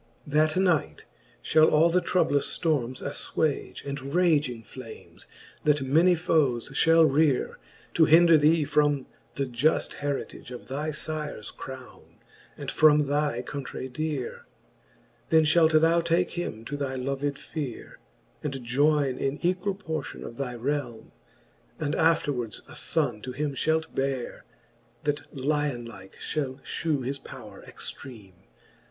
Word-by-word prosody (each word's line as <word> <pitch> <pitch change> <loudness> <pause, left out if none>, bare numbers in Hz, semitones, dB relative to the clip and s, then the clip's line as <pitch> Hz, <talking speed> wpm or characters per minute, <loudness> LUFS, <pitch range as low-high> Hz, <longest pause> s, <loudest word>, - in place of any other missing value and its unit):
XXIII. 145 - -9
That 155 - -4
knight 165 - +1 0.4
fhall 155 0 +5
all 160 +3 +5
the 180 +1 +3
troublous 155 -5 +1
ftormes 130 -7 -1
affwage. 145 +1 -2
And 140 +1 -5
raging 150 -10 +2
flames, 115 -1 -11 0.4
that 150 -2 +2
many 165 +7 +4
foes 150 -8 +1
fhall 165 +3 +5
reare, 145 -1 +2 0.4
To 160 - +5
hinder 165 +2 +7
thee 155 +1 +4
from 145 -2 +2 0.3
the 140 - -1
juft 130 +5 +1
heritage 140 -3 -4
Of 125 -1 -9
thy 150 +4 -2
fires 150 -6 -4
Crowne, 130 -1 -11 0.4
and - - -5
from 150 -1 +5
thy 145 -3 0
countrey 135 -1 -6
deare 140 -1 -4 0.8
Then 160 -1 +5
fhalt 160 0 +5
thou 165 +1 +4
take 170 +2 +1
him 115 -10 -5
to 145 - -4
thy 135 -2 -3
loved 140 +2 -2
fere. 145 -8 -7 0.4
And 140 -2 -3
joyne 140 +2 +2
in 135 +1 -1
equall 185 +3 0
portion 160 -8 -5
of 115 - -9
thy 135 -3 -3
realme: 125 -2 -3 0.7
And 145 0 -1
afterwards 145 -9 +1
a - - -12
fonne 140 -9 -1
to 125 +2 -6
him 145 +2 -2
fhalt 160 +3 0
beare. 135 -2 -3 0.6
That 145 0 -2
lion 140 -3 -1
like 95 -4 -12
fhall 135 -3 -3
fhew 150 -6 -2
his 135 +2 -3
powre - - -11
extreame. 105 -9 -10
145 Hz, 135 wpm, -27 LUFS, 130-160 Hz, 0.8 s, hinder